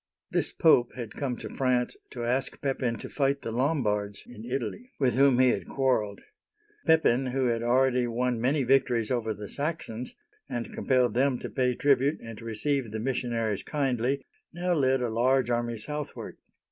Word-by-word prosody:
This - - 0
Pope 140 -8 +4
had 120 -4 -6
come 130 -4 -3
to - - -7
France 125 -2 +1
to 120 - -6
ask 125 +3 -1
Pepin 130 -4 -1
to - - -7
fight 140 -1 0
the 115 - -3
Lom'bards 110 -6 0
in 110 -3 -11
Italy, 130 - -4
with 130 -3 +2
whom 135 -1 +5
he 130 0 +5
had - - -1
quarreled. 125 -7 0 0.7
Pepin, 135 -6 +4
who 130 +1 0
had 115 -2 +1
already 125 +1 +3
won 120 0 -1
many 135 +3 +2
victories 125 -3 +2
over 115 -3 0
the 105 +1 -7
Saxons, 140 -5 -4 0.3
and 120 -1 -4
compelled 125 -2 +2
them 130 +1 +2
to - - -7
pay 125 -2 +1
tribute 140 +2 +2
and 115 -1 -9
to 115 - -10
receive 125 +3 -1
the 110 +1 -4
mis 125 +2 -1
sionaries 115 -4 -2
kindly, 135 -2 -1 0.3
now 180 +1 -1
led 135 -4 +2
a 120 - 0
large 125 +2 +2
army 120 -1 -1
southward. 150 +6 -5
125 Hz, 175 wpm, -28 LUFS, 115-135 Hz, 0.7 s, whom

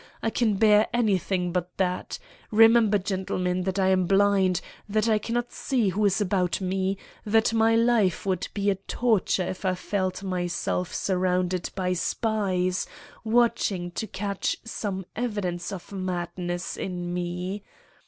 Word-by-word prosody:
I 225 - +1
can 220 -4 +1
bear 210 +1 +5
anything 190 -5 +1
but 180 0 -3
that. 180 -1 -1 0.3
Remember, 225 -1 +6
gentlemen, 185 -2 -1
that 190 0 -1
I 190 -1 +3
am 185 -1 +2
blind; 195 -2 +3 0.3
that 215 +2 +1
I 215 -1 +3
cannot 240 +3 -2
see 245 -7 0
who 210 +3 -1
is 195 0 +2
about 185 -3 +1
me; 190 +1 -1 0.3
that 220 +1 +2
my 225 0 +4
life 230 -7 +2
would 185 -3 -1
be 200 0 +2
a - - 0 0.2
torture 220 -6 +2
if 185 - -5
I 185 -1 +1
felt 185 0 -2
myself 180 -1 -2
surrounded 185 -1 0
by 185 -1 0
spies 185 -2 0 0.4
watching 220 -6 +1
to 220 - -4
catch 200 0 -2
some 200 -4 -4
evidence 205 -7 -2
of 190 -1 -8
madness 175 -2 -3
in 175 -2 -4
me. 180 +3 -3
190 Hz, 145 wpm, -26 LUFS, 180-215 Hz, 0.4 s, Remember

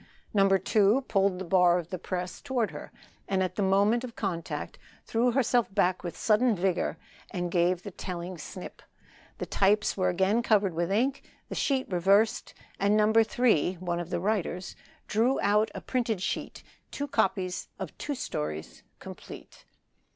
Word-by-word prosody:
No. 195 -2 +4
2 205 +5 +3
pulled 195 -2 +2
the 190 - -5
bar 180 0 +4
of 170 -1 -5
the 185 - -3
press 180 0 -4
toward 240 -8 -1
her, 150 - -9 0.4
and 190 -1 +1
at 185 - -2
the - - -3
moment 200 +5 +3
of 245 -2 -7
contact 175 -5 -4 0.3
threw 235 +2 +2
herself 245 -4 +2
back 185 -2 +2
with 175 - -5
sudden 225 +1 +3
vigor 180 -3 0 0.3
and 175 -1 -3
gave 175 0 +2
the 200 - -7
telling 180 0 -6 0.2
knip; 185 - -9 0.6
the - - -4
types 205 +2 +2
were 185 -2 +1
again 190 +6 +2
covered 205 -5 +2
with 170 +2 -1
ink, 260 +7 +1 0.3
the - - -4
sheet 265 -2 0
reversed, 195 +5 +2 0.2
and 200 +2 +3
No. 215 0 +3
3 225 -6 +3
(one 175 -1 -3
of 175 -1 -5
the - - -1
writers) 190 -2 -2 0.3
drew 235 +5 +2
out 210 +2 +3
a - - -5
printed 235 -5 -1
sheet 185 - -4 0.3
two 285 - -4
copies 185 -7 0
of - - -6
two 290 - -3
stories 75 - -5 0.2
complete. - - -11
195 Hz, 165 wpm, -28 LUFS, 180-220 Hz, 0.6 s, No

